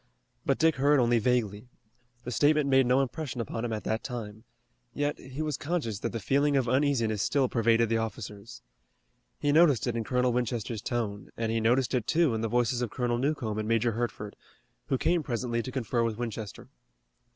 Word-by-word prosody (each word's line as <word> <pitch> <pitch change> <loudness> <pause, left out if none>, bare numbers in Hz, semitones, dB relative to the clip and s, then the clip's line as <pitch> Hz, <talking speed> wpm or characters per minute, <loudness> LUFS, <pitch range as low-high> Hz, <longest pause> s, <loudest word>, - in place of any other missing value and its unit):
But - - +2
Dick 160 -2 +3
heard 145 +2 +4
only 120 -1 +3
vaguely. 110 -2 0 0.6
The 125 - -5
statement 145 +4 +3
made 135 -2 +4
no 130 +2 +4
impression 135 -1 -5
upon 115 0 -3
him 120 - -2
at 110 -1 -3
that 110 +1 -2
time. 110 -4 -6 0.5
Yet 145 0 -1
he 135 +4 -6
was 150 -4 -2
conscious 145 - -2
that - - -3
the 115 - -3
feeling 140 +7 +2
of 130 -2 +1
uneasiness 125 -5 +1
still 135 -2 +2
pervaded 115 -1 +2
the 115 +1 +1
officers. 110 0 -6 0.7
He 145 - +1
noticed 150 -5 +5
it 120 -2 -1
in 115 - -1
Colonel 125 +1 +1
Winchester's 120 -3 -2
tone, 105 -5 -3
and 115 -1 -1
he 115 - +1
noticed 120 +3 +2
it, 120 -3 0
too, 165 -5 +3
in 110 - -2
the 115 - 0
voices 120 +1 +1
of 120 - -1
Colonel 120 0 -1
Newcomb 125 -6 -1
and 110 - -3
Major 115 +1 +2
Hertford, 110 -2 -4 0.5
who 135 - +1
came 170 +5 +1
presently 120 -3 -2
to 130 - -6
confer 120 -2 -1
with 115 -2 -1
Winchester. 110 -3 -6
120 Hz, 195 wpm, -28 LUFS, 115-135 Hz, 0.7 s, noticed